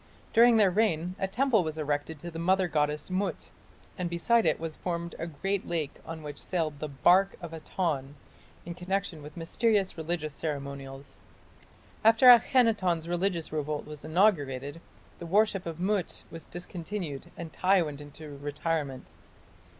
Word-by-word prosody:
During 235 0 +7
their 200 -4 +5
reign 180 -4 +1
a 190 - 0
temple 230 0 +2
was 155 -1 -4
erected 150 +1 -2
to 170 +4 -8
the 165 - -6
mother 185 +2 +2
goddess 150 +1 -1
Mut, 195 +2 -2 0.5
and 180 -1 -1
beside 225 +7 +2
it - - +2
was 160 -1 -5
formed 170 -1 -3
a 165 - -3
great 195 +5 -2
lake 160 -4 -3
on 160 -1 -6
which 145 -1 -7
sailed 160 -5 -2
the 155 - -3
"barque 180 +7 +4
of 170 -2 -8
Aton" 155 -4 -2 0.5
in 170 - -5
connection 180 -1 -3
with 150 +3 -11
mysterious 195 +3 +1
religious 160 -2 -2
ceremonials. 140 -2 -6 0.8
After 225 +3 +5
Akhenaton's 225 -9 +5
religious 175 -1 -1
revolt 150 -1 -2
was 150 -1 -9
inaugurated, 155 -5 +1 0.4
the 170 - -7
worship 195 0 +2
of 165 0 -5
Mut 190 -1 -1
was 165 -1 -9
discontinued 175 -3 -5
and 165 -2 -7
Tiy 185 -2 +3
went 145 -1 -6
into 145 0 -10
retirement. 145 -1 -3
170 Hz, 150 wpm, -29 LUFS, 150-190 Hz, 0.8 s, During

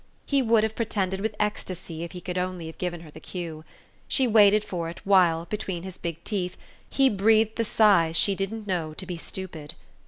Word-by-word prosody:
She 280 -1 +2
would 225 -3 +3
have 220 0 0
pretended 195 -4 -1
with 215 0 -2
ecstasy 185 -5 -3
if 170 +1 -6
he 180 - -7
could 180 +1 -3
only 180 -2 -3
have 160 - -9
given 175 -2 -3
her 160 -3 -12
the 155 - -11
cue. 165 -3 -6 0.4
She 265 - +2
waited 210 -2 +5
for 170 -5 -4
it 170 - -9
while, 175 -4 +4
between 190 -4 -4
his 190 -1 -8
big 170 -1 -5
teeth, 185 -4 -3 0.3
he 270 -1 +4
breathed 220 0 +3
the 230 - 0
sighs 195 -7 +4
she 200 - +4
didn't 195 +3 -4
know 170 -6 -2
to 190 - -5
be 180 -1 -5
stupid. 165 -3 -6
185 Hz, 205 wpm, -26 LUFS, 170-210 Hz, 0.4 s, waited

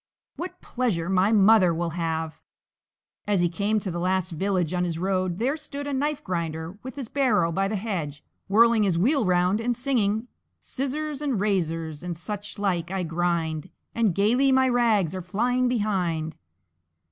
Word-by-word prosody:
What 360 +1 -6
pleasure 205 -9 -1
my 190 +2 +3
mother 200 -4 +5
will 170 0 -2
have!" 160 -1 -3 0.9
As 200 -3 +2
he 175 - +2
came 205 +5 0
to 190 - -3
the 170 - -3
last 185 +1 0
village 180 0 0
on 180 0 0
his 170 -2 -2
road 185 -1 -1
there 260 +7 0
stood 290 -2 -7
a 285 - -3
Knife 290 +2 -1
grinder, 170 0 -4
with 260 +1 -8
his 275 -5 -5
barrow 220 -11 +2
by 195 +4 0
the 215 - -2
hedge, 170 -9 -4 0.2
whirling 230 +2 +5
his 190 -5 +2
wheel 255 - +2
round 180 +3 +2
and 240 +1 0
singing: 235 -4 0 0.3
"Scissors 285 +2 -3
and 275 -8 0
razors 165 -6 -1
and 175 -2 -5
such 205 +3 -6
like 180 -4 -1
I 190 -1 -2
grind; 165 -1 -1 0.2
And 220 -7 +1
gaily 245 +7 +3
my 260 0 +4
rags 220 -8 +2
are 185 - -4
flying 245 +8 0
behind." 180 -9 -1
195 Hz, 170 wpm, -25 LUFS, 170-235 Hz, 0.9 s, mother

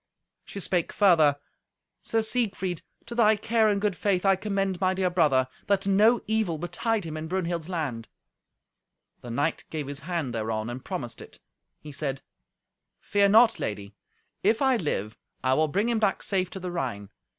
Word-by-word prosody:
She 200 - -8
spake 180 -3 0
further, 160 -8 +4 0.6
"Sir 225 -1 0
Siegfried, 200 -7 0 0.2
to 235 - -8
thy 220 -2 +4
care 220 +1 +2
and 200 -1 +1
good 205 -2 0
faith 190 0 0
I 195 0 +5
commend 195 -1 -2
my 185 0 +2
dear 185 -1 0
brother, 145 -7 +3 0.2
that 200 -1 +1
no 210 +4 +4
evil 220 -7 0
betide 220 +5 -2
him 155 -1 -5
in 155 0 -5
Brunhild's 170 -2 -2
land." 135 -11 -3 1.1
The 120 - -9
knight 145 +7 -1
gave 155 -2 -4
his 140 +1 -5
hand 160 -5 -3
thereon, 110 0 -2
and 125 +1 -7
promised 120 -1 -5
it. - - -13 0.4
He 150 - -10
said, 135 -1 -3 0.8
"Fear 200 -1 +2
not, 225 +2 +5
lady; 100 -1 -4 0.5
if 215 +3 +2
I 265 -2 +3
live, 110 - -3 0.2
I 130 0 +3
will 155 +3 +3
bring 200 +9 0
him 235 -2 +1
back 210 -3 0
safe 185 -3 0
to 190 - -7
the 180 -1 -5
Rhine. 115 - -4
180 Hz, 175 wpm, -26 LUFS, 145-205 Hz, 1.1 s, I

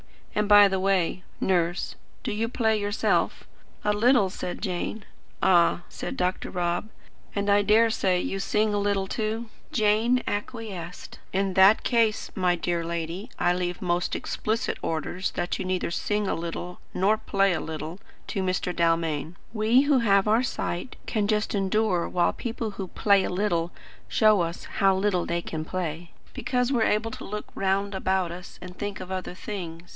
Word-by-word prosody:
And, 210 0 0
by 205 -1 +9
the 190 -1 -1
way, 185 -2 +1 0.2
Nurse, 175 -1 0 0.3
do - - -2
you 220 +2 0
play 220 -3 +1
yourself?" 205 +1 0 0.4
"A 210 - +2
little," 225 -2 +4
said 180 - -5
Jane. 190 +3 -3 0.4
"Ah," 175 -1 +4
said - - -6
Dr. 180 0 -1
Rob. 175 +3 -1 0.5
"And 200 0 -1
I 200 0 +5
dare 220 +3 +4
say 185 -4 +1
you 195 - -2
sing 210 +2 +1
a 205 - +1
little, 200 -1 +1
too?" 220 +3 -3 0.2
Jane 220 +3 +3
acquiesced. 205 -5 -5
"In 195 0 +1
that 195 +3 +6
case, 230 -3 +1
my 180 -3 +2
dear 170 0 -1
lady, 170 +4 -4
I 175 - +3
leave 180 0 -2
most 175 -1 0
explicit 220 +2 -2
orders 165 +4 -2
that 175 - -2
you 190 - -3
neither 185 -2 -1
sing 205 +3 -1
a - - +1
little 170 +2 -5 0.2
nor 200 +4 +3
play 195 -2 +2
a - - -1
little 160 +3 -6 0.3
to 195 - -2
Mr. 185 -1 -1
Dalmain. 165 -2 0 0.2
We, 225 +3 +4
who 285 -2 +3
have 200 -3 +3
our 220 +4 +4
sight, 180 -3 -3
can 210 -3 0
just 210 0 0
endure 195 -2 +1
while 175 -1 +2
people 230 -2 -4
who 195 -1 -5
'play 200 +1 +3
a - - -2
little' 175 -3 0 0.4
show 215 -3 +4
us 170 +1 -3 0.2
how 195 -1 +5
little 190 -2 +1
they 170 0 -1
can 155 -1 -4
play; 170 -1 -4 0.2
because 250 0 0
we 250 - +2
are - - +3
able 225 +2 +1
to - - -7
look 210 +1 -5
round 195 +1 0
about 190 -2 0
us 180 +1 -9
and 180 0 -9
think 205 0 -4
of 185 0 -7
other 185 -1 -4
things. 175 -4 -7
195 Hz, 175 wpm, -26 LUFS, 175-210 Hz, 0.5 s, by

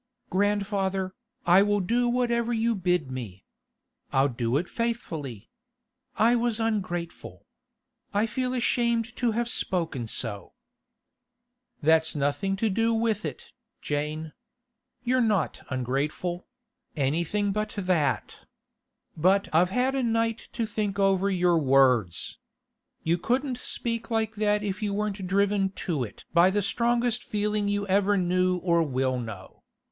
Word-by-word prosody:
'Grandfather, 195 -1 0 0.3
I 175 +3 +6
will 205 0 +2
do 240 +6 +1
whatever 240 -1 +1
you 230 0 +1
bid 180 -8 0
me. 115 -8 -7 0.7
I'll 135 +1 +3
do 120 +1 0
it 175 +4 -2
faithfully. 160 - -4 0.6
I 230 +3 +4
was 235 -1 0
ungrateful. 185 -7 -3 0.7
I 205 +2 +2
feel 250 +3 -2
ashamed 235 -1 +1
to 240 -3 +1
have 235 +1 0
spoken 165 - -1
so.' 105 -3 -4 1.3
'That's 160 +1 +3
nothing 145 +7 0
to 220 +3 0
do 225 +3 +2
with 225 -2 0
it, - - -7 0.3
Jane. 150 +2 -3 0.7
You're 255 +1 +2
not 215 -5 +1
ungrateful; 140 +8 -2 0.5
anything 170 +8 0
but 210 +2 -2
that. 180 -6 0 0.8
But 190 +5 +3
I've 175 +3 +4
had 250 +6 +1
a 270 - 0
night 230 -1 0
to 235 -1 -1
think 210 -2 -2
over 195 0 +3
your 180 -3 +3
words. 130 - +2 0.6
You 170 +2 +1
couldn't 250 - -1
speak 230 -2 -3
like 225 -1 0
that 210 0 +1
if 205 0 -3
you 205 -2 -1
weren't 205 -2 -2
driven 200 +1 +2 0.2
to 155 -8 0
it 110 - -9
by 170 +2 +6
the 205 +1 0
strongest 235 +2 +1
feeling 210 0 -1
you 205 0 0
ever 200 +1 +2
knew 180 0 +2
or 170 -1 +2
will 130 -4 0
know. 110 -6 -8
195 Hz, 130 wpm, -27 LUFS, 160-225 Hz, 1.3 s, I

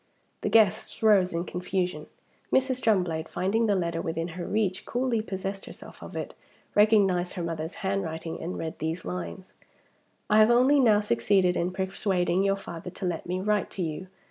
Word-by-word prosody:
The - - -1
guests 215 0 +2
rose 200 -4 +5
in 170 0 -1
confusion. 180 -3 -3 0.4
Mrs. 260 -1 +2
Drumblade, 180 -7 +1
finding 200 +6 +1
the 205 - +3
letter 170 -2 -1
within 165 +1 -3
her 175 +1 -6
reach, 200 -3 0
coolly 245 -2 0
possessed 195 -1 -5
herself - - -11
of - - -9
it; - - -5 0.4
recognized 200 -4 +3
her 180 - -4
mother's 165 0 -4
handwriting; 165 -4 -3
and 175 +3 -4
read 160 -1 -5
these 160 +2 -3
lines: 90 -2 -6 0.7
"I 215 - +4
have 215 +1 +6
only 255 +4 +5
now 215 -5 +5
succeeded 180 - +2
in 175 - 0
persuading 190 -1 0
your 195 0 +2
father 180 -3 -8
to 185 - -6
let 175 -2 -3
me 180 +1 -2
write 210 +1 0
to 185 - -4
you. 165 +3 -4
185 Hz, 170 wpm, -27 LUFS, 170-210 Hz, 0.7 s, have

